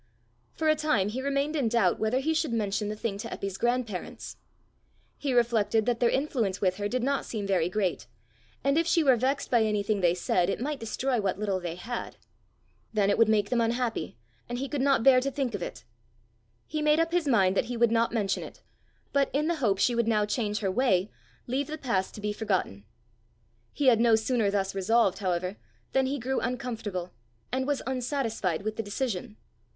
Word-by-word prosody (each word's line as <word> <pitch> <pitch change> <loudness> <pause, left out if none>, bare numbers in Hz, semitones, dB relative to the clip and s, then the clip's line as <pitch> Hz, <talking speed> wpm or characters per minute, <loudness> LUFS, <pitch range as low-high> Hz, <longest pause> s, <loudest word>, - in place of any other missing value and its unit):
For 320 - -1
a 310 - +6
time 240 -11 +1
he 250 +5 -4
remained 280 +2 0
in 265 -7 +1
doubt 220 -6 +2
whether 230 +4 +1
he 320 +3 +1
should 315 -4 0
mention 210 -1 -1
the 215 - -3
thing 210 -2 -3
to 230 - -5
Eppy's 195 -4 -5
grandparents. 240 -5 -2 0.8
He 280 - -1
reflected 230 -3 +2
that 240 -2 0
their 240 - +4
influence 245 -9 0
with 185 -2 +1
her 205 0 -1
did 250 +1 -1
not 275 +1 0
seem 215 -3 -4
very 180 -4 +1
great, 185 -6 -1 0.6
and 275 +4 +3
if 335 - 0
she 335 -1 +3
were 265 -3 +5
vexed 265 +4 -1
by 240 -2 +4
anything 210 -1 0
they 175 -1 +3
said, 180 0 +1
it - - -1
might 290 +4 -3
destroy 245 +2 -1
what 190 -2 -1
little 200 -2 -1
they 175 -2 -5
had. 240 +7 -6 0.7
Then 205 -2 +2
it - - +1
would 225 -1 +5
make 210 -2 +2
them 240 -2 +2
unhappy, 230 - -1 0.3
and 240 - -3
he 270 +2 -3
could 285 -1 -2
not 275 -4 +3
bear 260 -1 +7
to 275 - -1
think 270 -4 -2
of 205 - -4
it. - - -6 0.8
He 305 0 -3
made 300 +1 +3
up 330 0 +1
his 345 -3 +1
mind 195 -7 +3
that - - +2
he 245 0 -4
would 235 -1 +3
not 230 0 +2
mention 205 -4 0
it, - - -10 0.5
but, 280 -1 +3
in 290 +3 +1
the 340 0 0
hope 205 -6 +2
she 240 +5 +2
would 235 -1 +1
now 215 -2 +2
change 210 -1 -1
her 195 -2 0
way, 205 -4 +2 0.3
leave 265 +3 -1
the 310 0 -5
past 200 -10 -1
to 210 - -8
be 210 0 -1
forgotten. 190 - -2 0.9
He 290 - -2
had 240 -4 +6
no 230 -1 +5
sooner 220 -1 +1
thus 195 -1 -1
resolved, 195 +1 +2
however, 185 0 -2 0.3
than 265 0 +2
he 280 +2 -1
grew 265 +1 -1
uncomfortable, 225 -7 -4 0.4
and 260 +1 -1
was 290 -2 -1
unsatisfied 245 - -2
with 215 0 -3
the - - 0
decision. 210 -1 -4
230 Hz, 210 wpm, -28 LUFS, 200-265 Hz, 0.9 s, bear